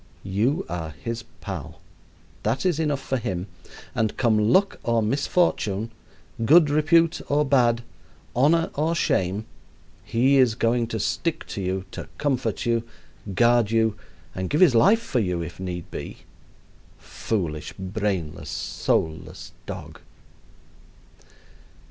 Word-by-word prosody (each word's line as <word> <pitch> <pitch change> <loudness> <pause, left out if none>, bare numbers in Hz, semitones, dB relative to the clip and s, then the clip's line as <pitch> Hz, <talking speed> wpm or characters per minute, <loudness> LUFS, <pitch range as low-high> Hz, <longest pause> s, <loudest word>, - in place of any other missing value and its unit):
You 105 +9 0
are 80 -3 -5
his 115 -1 -3 0.2
pal. 80 -6 -6 0.6
That 120 - -1
is 175 -4 +2
enough 150 -3 0
for 135 0 -1
him, 95 -6 -3 0.5
and 110 -2 -1
come 110 -4 +3
luck 195 +7 +3
or 115 -1 +1
misfortune, 115 - 0 0.5
good 150 +4 +6
repute 165 +3 +3
or 150 +1 +3
bad, 120 -4 +3 0.5
honor 160 +7 +3
or 160 +3 0
shame, 100 - 0 0.6
he 130 +4 +3
is 125 -4 +4
going 115 +1 +1
to 110 -1 -3
stick 165 - -1
to 100 - -4
you, 95 0 -2
to - - -7
comfort 130 -6 -1
you, 115 -1 +2 0.5
guard 120 -1 +4
you, 110 -1 +2 0.4
and 95 0 -3
give 150 - +1
his 170 -8 +7
life 200 - +5
for 130 - 0
you 90 -5 -1
if 85 +2 -8
need 90 -2 -5
be - - -6 0.8
foolish, 80 -9 -3
brainless, 95 -7 -3
soulless 80 +2 -2 0.2
dog! - - -7
115 Hz, 125 wpm, -24 LUFS, 95-140 Hz, 0.8 s, his